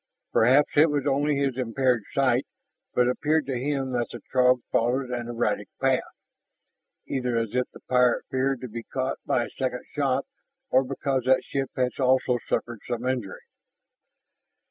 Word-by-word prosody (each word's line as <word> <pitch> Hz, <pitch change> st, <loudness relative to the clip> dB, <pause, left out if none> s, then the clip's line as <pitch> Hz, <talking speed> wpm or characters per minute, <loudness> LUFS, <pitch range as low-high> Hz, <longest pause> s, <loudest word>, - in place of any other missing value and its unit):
Perhaps 130 Hz, +6 st, +5 dB
it 155 Hz, +2 st, +7 dB
was 145 Hz, -2 st, -1 dB
only 145 Hz, +1 st, +2 dB
his 135 Hz, -2 st, 0 dB
impaired 125 Hz, 0 st, +1 dB
sight, -, -, +2 dB, 0.5 s
but 125 Hz, -, +4 dB
it 125 Hz, -, +3 dB
appeared 155 Hz, +2 st, +1 dB
to 130 Hz, -2 st, -2 dB
him 135 Hz, 0 st, -1 dB
that 120 Hz, -1 st, 0 dB
the 120 Hz, -, -7 dB
Throg 125 Hz, -1 st, +4 dB
followed 125 Hz, +2 st, +1 dB
an 120 Hz, -1 st, -3 dB
erratic 120 Hz, -1 st, -1 dB
path, -, -, +3 dB, 1.0 s
either 125 Hz, -3 st, -1 dB
as 115 Hz, -1 st, -1 dB
if 125 Hz, 0 st, 0 dB
the -, -, -15 dB
pilot 125 Hz, -1 st, +2 dB
feared 130 Hz, 0 st, 0 dB
to 130 Hz, -, -5 dB
be 115 Hz, 0 st, -6 dB
caught 130 Hz, +3 st, -3 dB
by 120 Hz, -, +2 dB
a -, -, -9 dB
second 130 Hz, -2 st, -2 dB
shot, 140 Hz, -2 st, 0 dB, 0.5 s
or 130 Hz, +1 st, +5 dB
because 135 Hz, -1 st, -2 dB
that 130 Hz, 0 st, +4 dB
ship 135 Hz, -1 st, -3 dB
had 125 Hz, +1 st, -1 dB
also 130 Hz, -1 st, +3 dB
suffered 120 Hz, -2 st, -1 dB
some 120 Hz, 0 st, -3 dB
injury. 125 Hz, -7 st, -2 dB
130 Hz, 165 wpm, -26 LUFS, 125-135 Hz, 1.0 s, it